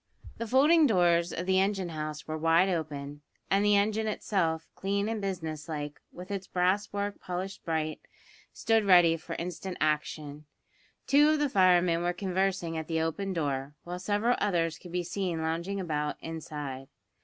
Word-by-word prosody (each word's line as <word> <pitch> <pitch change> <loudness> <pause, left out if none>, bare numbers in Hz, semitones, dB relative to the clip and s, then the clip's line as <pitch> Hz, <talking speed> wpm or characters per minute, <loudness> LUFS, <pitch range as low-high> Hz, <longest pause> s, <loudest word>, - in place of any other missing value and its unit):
The 230 - -3
folding 295 +6 +5
doors 175 -5 +3
of 170 - -4
the 190 0 +3
engine 195 -2 0
house 155 -1 -5
were 155 - -3
wide 165 +4 +3
open, 145 -4 -4 0.3
and 195 +1 +4
the 205 0 +4
engine 215 +2 +1
itself, 170 -6 -1
clean 200 +1 -1
and 225 -1 -2
business 160 -6 -4
like, 150 -2 -5
with 180 +2 -9
its 195 -2 -4
brass 185 +3 +1
work 205 0 -3
polished 185 +2 -5
bright, 155 -1 -2 0.5
stood 225 -1 +2
ready 175 -4 +6
for 165 0 -7
instant 180 +1 -5
action. 150 -1 -2 0.6
Two 290 +2 +5
of 310 - +3
the 295 -1 +1
firemen 180 -5 +4
were 175 0 0
conversing 185 -2 -1
at 160 -1 -4
the 160 -1 0
open 165 +5 -2
door, 145 -4 -2
while 175 +1 -6
several 205 +6 +1
others 165 -5 0
could 175 - -11
be 180 0 -1
seen 175 -1 -2
lounging 170 +5 -2
about 150 -4 -2
inside. 150 -5 -6
175 Hz, 165 wpm, -29 LUFS, 160-200 Hz, 0.6 s, ready